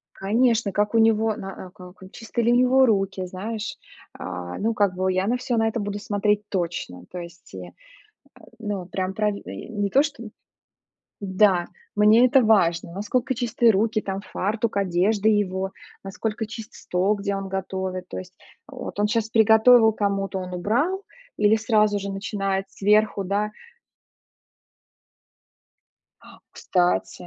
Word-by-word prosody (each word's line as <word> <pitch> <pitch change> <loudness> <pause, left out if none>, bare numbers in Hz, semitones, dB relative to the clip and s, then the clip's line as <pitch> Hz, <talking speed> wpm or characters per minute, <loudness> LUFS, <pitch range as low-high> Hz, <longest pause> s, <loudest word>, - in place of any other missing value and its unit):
Конечно, 225 +1 +1
как 205 +3 0
у - - +5
него, 225 -1 +3
на 195 -1 -8
а, 180 - -13
как 180 -1 -14
и 190 - -13
чистые 230 +1 -3
ли 240 - +4
у 240 - +4
него 255 +1 +5
руки, 195 -3 0
знаешь? 210 +4 -5 0.4
А, 90 -1 -6
ну, 225 +2 0
как 200 -4 +1
бы 185 0 0
я 185 +1 0
на 245 +4 +1
все 245 -1 -2
на 225 - +2
это 225 0 -1
буду 205 0 -4
смотреть 210 0 -1
точно. 170 - -4
То 180 - -7
есть 170 0 -11
и, - - -8
э, - - -12 0.9
ну, 205 -5 -4
прям 185 0 -3
пра 210 +1 0
и 200 - -8
не 205 -3 -2
то, 275 - +5
что 285 -6 -5 1.0
да, 190 -2 +2 0.3
мне 215 +4 +6
это 265 0 +4
важно, 170 -6 +2
насколько 240 +7 -1
чистые 235 -1 +2
руки, 215 +2 +1
там 195 0 -4
фартук, 215 +2 -2
одежда 200 +3 +1
его, 195 -3 0 0.3
насколько 215 +3 -4
чист 220 0 -9
стол, 185 +4 0
где 200 -1 -3
он 195 0 -5
готовит. 190 -1 -4
То - - -6
есть 185 0 -10 0.3
вот 260 -6 -8
он 210 - +3
щас 220 +1 -1
приготовил 220 +1 +6
кому-то, 195 -2 -1
он 180 0 -7
убрал 285 - 0 0.3
или 210 +1 +4
сразу 215 -2 +2
же 200 0 -5
начинает 195 -1 -2
сверху, 210 0 +2
да. 205 +3 -1 2.7
А, - - -16
кстати, 180 0 -1
205 Hz, 155 wpm, -24 LUFS, 190-225 Hz, 2.7 s, мне